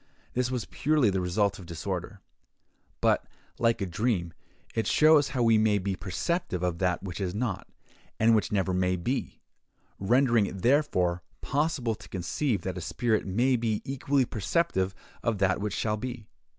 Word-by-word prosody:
This 125 0 0
was 125 -3 -2
purely 145 -7 +2
the 95 -1 0
result 100 +3 0
of 90 - -11
disorder; 85 -2 -5 0.8
but, - - +2 0.3
like 115 -2 +2
a - - +1
dream, 90 -2 -1 0.4
it 115 - -1
shows 155 -2 +5
how 125 -4 0
we 115 -1 +5
may 105 -1 +3
be 100 0 -2
perceptive 95 - -2
of 90 -1 -1
that 90 -1 0
which 95 0 -5
is 95 0 -2
not, 105 -4 -2 0.5
and 115 +1 +5
which 110 - +1
never 95 -2 +1
may 90 0 +1
be; 120 +10 -3 0.6
rendering 115 +1 +3
it, 95 -1 -7
therefore, 95 -11 +2 0.2
possible 140 -5 0
to - - -12
conceive 95 - -1
that 95 -1 -3
a - - -7
spirit 110 +4 0
may 120 +7 +2
be 115 -3 -1
equally 135 0 +1
perceptive 100 - 0 0.3
of 115 -2 0
that 95 0 +1
which 105 -1 -2
shall 105 -1 0
be. 120 -1 -6
105 Hz, 165 wpm, -28 LUFS, 95-125 Hz, 0.8 s, shows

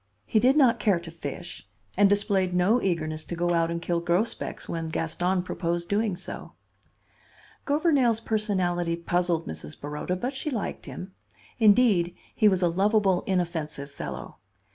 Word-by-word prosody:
He 215 - +2
did 260 +6 +4
not 250 -5 +5
care 205 -4 +2
to 170 -1 -10
fish, 165 +2 -7 0.3
and 200 +1 +5
displayed 200 -3 +1
no 200 +7 +3
eagerness 155 -4 -1
to 175 - -5
go 175 +1 0
out 165 -1 +2
and 170 0 -2
kill 170 0 -1
grosbecs 175 +6 -1
when 165 -1 -3
Gaston 175 +3 0
proposed 170 -1 -2
doing 205 -1 +1
so. 185 - -8 1.1
Gouvernail's 285 -6 +3
personality 185 -6 0
puzzled 170 0 0
Mrs. 80 -1 -7
Baroda, 150 +5 -3
but 245 +9 -3
she 270 +3 -3
liked 230 -8 -4
him. 185 +1 -8 0.5
Indeed, 205 -6 +4 0.2
he 215 - +4
was 190 -3 +3
a - - +5
lovable, 195 +1 +2
inoffensive 165 -6 -2
fellow. 65 - -7
180 Hz, 150 wpm, -26 LUFS, 170-210 Hz, 1.1 s, not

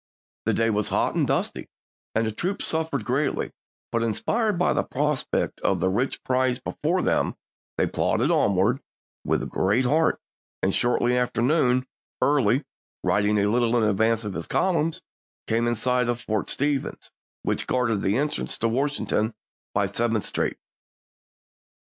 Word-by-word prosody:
The - - +2
day 115 0 +2
was 105 -1 0
hot - - +1
and - - +1
dusty, - - -1 0.5
and 110 +1 +2
the 110 - -1
troops 180 - -2
suffered 160 -7 0
greatly, 135 +4 0 0.4
but 115 - +1
inspired 205 - 0
by 180 - +2
the - - +2
prospect 150 +1 -1
of - - +1
the 95 - +2
rich 125 +7 -1
prize 130 -1 +1
before 170 +7 -1
them, - - +1 0.4
they - - +3
plodded - - +1
onward 100 +7 +2 0.4
with - - 0
good 105 +7 +2
heart, 160 +5 +2 0.4
and 95 - +2
shortly 120 0 +2
after 125 -1 0
noon 130 -3 +3 0.3
Early, 135 -2 +3 0.4
riding 105 +1 +2
a 100 0 +3
little 120 +1 +2
in 115 - +2
advance 110 +2 +2
of 105 - -3
his 80 -1 -5
column, 165 -4 +1 0.5
came 115 +1 +1
in 120 - +1
sight 125 +1 +1
of 120 0 0
Fort 110 -4 -2
Stevens, 145 -1 -1 0.3
which - - -1
guarded 120 -5 +1
the 100 +4 +1
entrance 150 +2 0
to 115 - +1
Washington 120 -3 0 0.4
by 100 0 +1
Seventh 110 +2 0
Street. - - -1
120 Hz, 155 wpm, -25 LUFS, 110-140 Hz, 0.5 s, they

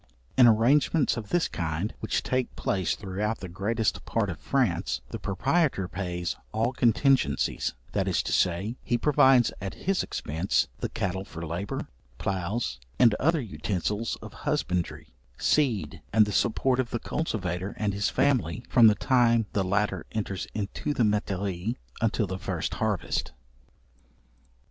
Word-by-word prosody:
In 125 -2 +8
arrangements 135 +7 +4
of 115 -4 -6
this 175 -1 +2
kind, 85 +5 -3
which - - -1
take 130 -1 -1
place 95 -3 0
throughout 105 +3 -3
the 95 - -6
greatest 105 +5 -1
part - - 0
of - - -8
France, 65 0 0
the - - -5
proprietor 135 - +1
pays 90 -3 -3 0.2
all 115 +4 0
contingencies; 125 - +2 0.2
that 100 -1 0
is 95 - +1
to - - -3
say, 95 +7 +1
he 120 - 0
provides 130 -2 +4
at 95 - -5
his 195 -1 0
expence, 75 -5 -1
the - - -2
cattle 95 0 -2
for 85 -3 -7
labour, 85 +5 -4 0.3
ploughs, 95 - -2 0.2
and 120 -4 +6
other 165 +3 +3
utensils 105 +3 -2
of - - -9
husbandry, 90 -8 -2 0.2
seed, 130 -10 +1
and 110 0 +5
the 105 - -4
support 125 +5 +1
of 125 -2 0
the - - -1
cultivator 95 - -3
and 105 -2 0
his 100 +1 0
family, 120 - +1
from 120 -3 +7
the 105 - +5
time 120 -3 +3
the 100 - +1
latter 105 +3 0
enters 100 -5 -3
into 105 +8 -3
the 120 - +2
metairies 100 -1 -1 0.3
until 110 -1 +1
the 95 0 -5
first - - -3
harvest. - - -1
105 Hz, 150 wpm, -27 LUFS, 95-120 Hz, 0.3 s, In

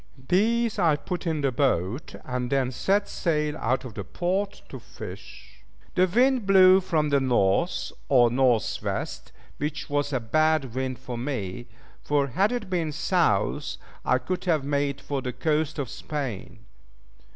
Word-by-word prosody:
These 225 +3 +2
I 165 -5 +4
put 175 +3 -5
in 160 -2 0
the 135 -1 +1
boat, 120 - 0
and 125 -1 -3
then 135 -2 +1
set 200 +9 +1
sail 150 -3 -1
out 130 +1 0
of 120 - -8
the - - -5
port 190 +3 -2
to - - -8
fish. - - -11 0.3
The 185 0 +3
wind 245 +2 +2
blew, 190 -1 +7
from 155 -4 0
the 140 -1 +3
North, 125 - +1 0.2
or 120 -4 +5
North 125 -3 +2
West, - - -4 0.3
which 150 0 -4
was 145 0 0
a 130 - 0
bad 145 +2 +1
wind 130 0 -2
for 125 -2 -6
me; 120 -4 -4 0.3
for 145 -1 +1
had 195 - +2
it 240 -5 -3
been 170 -4 -1
South - - 0 0.3
I 130 - +3
could 180 +9 -4
have 160 -6 +2
made 140 -1 -1
for 140 -2 -3
the 125 -1 -4
coast 155 +4 0
of 140 -3 -2
Spain. 135 -4 -6
145 Hz, 160 wpm, -26 LUFS, 130-180 Hz, 0.3 s, blew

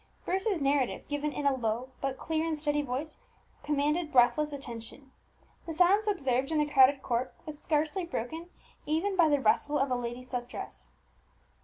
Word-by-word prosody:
Bruce's 385 0 0
narrative, 275 -2 0
given 290 +1 -2
in 290 - -4
a 280 - +4
low 240 +1 -2
but 270 -1 -2
clear 320 +3 -1
and 320 -2 -1
steady 295 -1 0
voice, 280 +3 -4 0.4
commanded 300 +3 0
breathless 265 +5 +4
attention. 265 0 -8 0.6
The 325 - -3
silence 385 +5 +4
observed 270 -8 0
in 315 - +1
the 300 - +3
crowded 270 -1 +5
court 245 +1 -1
was 300 -2 -7
scarcely 310 +4 0
broken 330 +2 -5 0.4
even 335 +6 0
by 340 -4 +5
the 290 -1 +3
rustle 285 +5 +2
of 275 -1 0
a - - +3
lady's 245 +1 -5
silk 245 -1 -3
dress. - - -8
290 Hz, 170 wpm, -30 LUFS, 255-315 Hz, 0.6 s, crowded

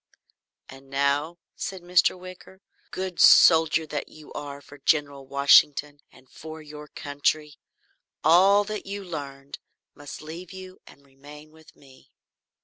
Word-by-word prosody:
"And 135 0 -15
now," 140 +4 -1 0.2
said 190 -2 -6
Mr. 180 +1 +2
Wicker, 185 +1 -13 0.3
"good 185 -1 -6
soldier 160 0 +6
that 150 -1 -6
you 155 -1 -15
are 145 -1 -7
for 145 0 -16
General 140 -2 -1
Washington 140 +1 +3
and 130 - -21
for 160 +4 -11
your 150 -1 -11
country, 145 +1 -3 0.6
all 190 +6 +5
that 210 -1 -7
you 200 0 -6
learned 140 -5 -8 0.3
must 145 0 -11
leave 165 +3 -9
you 185 -1 -11
and 140 - -18
remain 145 +3 -15
with 160 0 -20
me." 135 -2 -21
150 Hz, 135 wpm, -25 LUFS, 140-175 Hz, 0.6 s, soldier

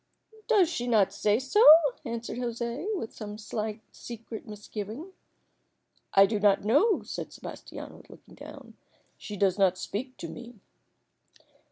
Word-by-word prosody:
"Does 410 -7 +5
she 245 -7 -3
not 205 -5 +3
say 210 +1 +2
so?" 265 - +2 0.4
answered 235 +1 -5
José, 235 - -3
with 225 - -6
some 210 -1 -7
slight 215 0 -4
secret 230 -1 -9
misgiving. 215 - -7 1.0
"I 195 - +8
do 210 +1 -1
not 200 -1 +3
know," 335 - +3
said - - -6
Sebastiano, - - -9
looking - - -16
down. - - -12 0.4
"She 210 - -7
does 195 0 +1
not 185 -2 +3
speak 255 +8 -5
to - - -6
me." 240 0 -10
225 Hz, 135 wpm, -28 LUFS, 205-245 Hz, 1.0 s, I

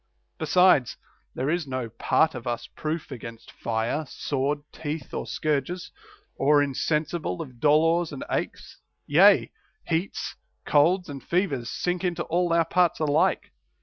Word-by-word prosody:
Besides, 160 -4 +4 0.4
there 130 - -2
is 170 -3 -1
no 130 -2 -3
part 155 +7 +2
of 120 -2 -7
us 120 0 -2
proof 155 0 -5
against 115 -3 -9
fire, 115 +7 -2
sword, 145 +2 -2
teeth, 155 -2 -6
or - - -4
scourges, 155 +4 -2 0.5
or 145 +1 +4
insensible 155 +5 -1
of 130 -7 -8
dolors 165 +4 +3
and 140 - -6
aches; - - -4 0.3
yea, - - +5 0.3
heats, 165 +4 -2 0.3
colds, 175 +5 +3
and 140 -3 -8
fevers 145 -10 -1
sink 180 +1 -2
into 175 -2 -1
all 175 0 0
our 165 0 +3
parts 175 0 +2
alike. 150 -2 +1
155 Hz, 135 wpm, -26 LUFS, 135-170 Hz, 0.5 s, yea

